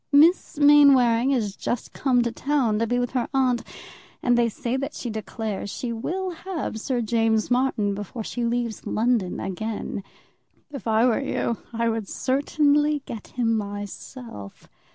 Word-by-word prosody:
Miss 310 Hz, +3 st, +4 dB
Mainwaring 275 Hz, -5 st, +6 dB
is 220 Hz, -7 st, 0 dB
just 240 Hz, -, -3 dB
come 250 Hz, -3 st, +2 dB
to 235 Hz, -, -1 dB
town 245 Hz, -4 st, +1 dB
to 230 Hz, -, +1 dB
be 245 Hz, +2 st, +1 dB
with 245 Hz, -1 st, -1 dB
her 250 Hz, -2 st, -1 dB
aunt, 255 Hz, -3 st, +2 dB, 0.6 s
and 245 Hz, -, +4 dB
they 240 Hz, -1 st, +3 dB
say 235 Hz, +3 st, -3 dB
that 275 Hz, +3 st, -3 dB
she 240 Hz, -, -4 dB
declares 215 Hz, -1 st, -4 dB
she 235 Hz, +3 st, -4 dB
will 365 Hz, +11 st, -3 dB
have 335 Hz, -9 st, -5 dB
Sir 250 Hz, -1 st, -1 dB
James 225 Hz, 0 st, +1 dB
Martin 245 Hz, -5 st, +1 dB
before 205 Hz, +3 st, -5 dB
she 240 Hz, +3 st, -4 dB
leaves 235 Hz, -1 st, -2 dB
London 225 Hz, -5 st, +1 dB
again. 205 Hz, +1 st, -4 dB, 0.7 s
If 275 Hz, -5 st, -7 dB
I 220 Hz, +1 st, +4 dB
were 250 Hz, +1 st, +2 dB
you, 235 Hz, -4 st, -1 dB
I 230 Hz, 0 st, 0 dB
would 225 Hz, -3 st, -1 dB
certainly 290 Hz, +2 st, +1 dB
get 220 Hz, -3 st, -7 dB
him 230 Hz, -2 st, 0 dB
myself. 205 Hz, -, -7 dB
240 Hz, 155 wpm, -24 LUFS, 220-270 Hz, 0.7 s, Mainwaring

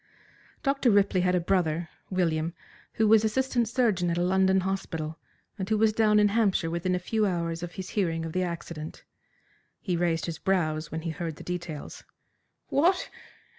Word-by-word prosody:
Dr. 275 Hz, -3 st, +2 dB
Ripley 200 Hz, -3 st, +3 dB
had 180 Hz, 0 st, +2 dB
a -, -, +3 dB
brother, 170 Hz, -2 st, 0 dB, 0.2 s
William, 165 Hz, -3 st, 0 dB, 0.4 s
who 220 Hz, -, +2 dB
was 220 Hz, 0 st, +6 dB
assistant 240 Hz, 0 st, +1 dB
surgeon 215 Hz, -8 st, +1 dB
at 170 Hz, -, 0 dB
a 175 Hz, -, +1 dB
London 190 Hz, +1 st, +3 dB
hospital, 165 Hz, -4 st, -3 dB, 0.4 s
and 190 Hz, +1 st, -3 dB
who 220 Hz, -, +2 dB
was 215 Hz, 0 st, +3 dB
down 210 Hz, -1 st, +4 dB
in 205 Hz, 0 st, +5 dB
Hampshire 200 Hz, -6 st, +1 dB
within 180 Hz, +2 st, 0 dB
a -, -, +1 dB
few 210 Hz, +4 st, 0 dB
hours 170 Hz, -2 st, -2 dB
of 175 Hz, 0 st, -6 dB
his 190 Hz, -, -6 dB
hearing 165 Hz, -5 st, -1 dB
of 160 Hz, -, -6 dB
the 185 Hz, -, 0 dB
accident. 170 Hz, -3 st, -5 dB, 0.8 s
He 180 Hz, -4 st, -2 dB
raised 165 Hz, -1 st, 0 dB
his 165 Hz, -1 st, -5 dB
brows 160 Hz, -5 st, 0 dB
when 160 Hz, -, -3 dB
he 165 Hz, 0 st, -3 dB
heard 160 Hz, 0 st, -4 dB
the -, -, -11 dB
details. 175 Hz, -4 st, -6 dB, 0.7 s
"What! 345 Hz, +7 st, +2 dB
180 Hz, 175 wpm, -27 LUFS, 165-210 Hz, 0.8 s, was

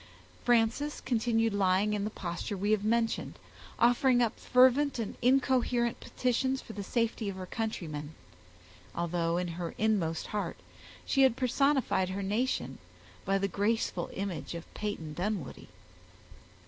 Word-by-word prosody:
Frances 240 Hz, +5 st, +2 dB
continued 225 Hz, -2 st, +1 dB
lying 200 Hz, +1 st, +2 dB
in 205 Hz, -1 st, -1 dB
the -, -, -1 dB
posture 185 Hz, +1 st, -4 dB
we 205 Hz, +3 st, 0 dB
have 215 Hz, -2 st, +2 dB
mentioned, 225 Hz, +1 st, 0 dB, 0.4 s
offering 245 Hz, +1 st, +4 dB
up 235 Hz, -3 st, +1 dB
fervent 260 Hz, +3 st, +4 dB
and 225 Hz, -3 st, -3 dB
incoherent 250 Hz, -2 st, +2 dB
petitions 260 Hz, +2 st, 0 dB
for 225 Hz, -, -10 dB
the 205 Hz, -, -5 dB
safety 225 Hz, 0 st, -1 dB
of 195 Hz, -, -5 dB
her 185 Hz, -1 st, -6 dB
countrymen, 160 Hz, -9 st, -4 dB, 0.8 s
although 170 Hz, 0 st, 0 dB
in 180 Hz, 0 st, -1 dB
her 170 Hz, 0 st, -5 dB
inmost 195 Hz, -7 st, +1 dB
heart 210 Hz, -, -2 dB, 0.5 s
she 270 Hz, -, +2 dB
had 260 Hz, -3 st, +5 dB
personified 260 Hz, -6 st, +2 dB
her 195 Hz, +1 st, -3 dB
nation 220 Hz, +7 st, -1 dB, 0.5 s
by 195 Hz, 0 st, +2 dB
the 195 Hz, 0 st, 0 dB
graceful 200 Hz, -2 st, -1 dB
image 190 Hz, -3 st, -4 dB
of 170 Hz, -, -6 dB
Peyton 185 Hz, -8 st, -4 dB
Dunwoodie. 180 Hz, -4 st, -4 dB
215 Hz, 135 wpm, -30 LUFS, 185-240 Hz, 0.8 s, had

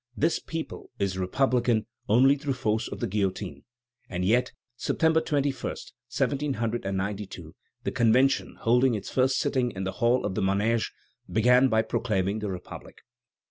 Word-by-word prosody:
This 165 Hz, +4 st, +2 dB
people 165 Hz, -1 st, -6 dB
is 100 Hz, -2 st, -1 dB
republican 120 Hz, +3 st, +1 dB, 0.2 s
only 130 Hz, +6 st, +6 dB
through 145 Hz, -1 st, -2 dB
force 110 Hz, -1 st, 0 dB
of -, -, -7 dB
the -, -, +1 dB
guillotine." 95 Hz, -9 st, -2 dB, 0.4 s
And 90 Hz, 0 st, -2 dB
yet, 120 Hz, +6 st, +2 dB, 0.2 s
September 160 Hz, +5 st, +2 dB
21, 145 Hz, -3 st, 0 dB
1792, 105 Hz, -, -3 dB, 0.3 s
the -, -, -1 dB
Convention, 125 Hz, +4 st, +2 dB
holding 125 Hz, +1 st, +3 dB
its 105 Hz, -, -6 dB
first 130 Hz, 0 st, +2 dB
sitting 125 Hz, -3 st, +1 dB
in 95 Hz, -4 st, -5 dB
the 95 Hz, -, -2 dB
Hall 120 Hz, +2 st, +3 dB
of 105 Hz, -, -2 dB
the -, -, -1 dB
Manège, 105 Hz, +4 st, +1 dB, 0.4 s
began 125 Hz, +4 st, +5 dB
by 110 Hz, -2 st, +2 dB
proclaiming 105 Hz, -3 st, -1 dB
the 105 Hz, -1 st, -3 dB
Republic. 90 Hz, -2 st, -8 dB
115 Hz, 140 wpm, -27 LUFS, 100-130 Hz, 0.4 s, only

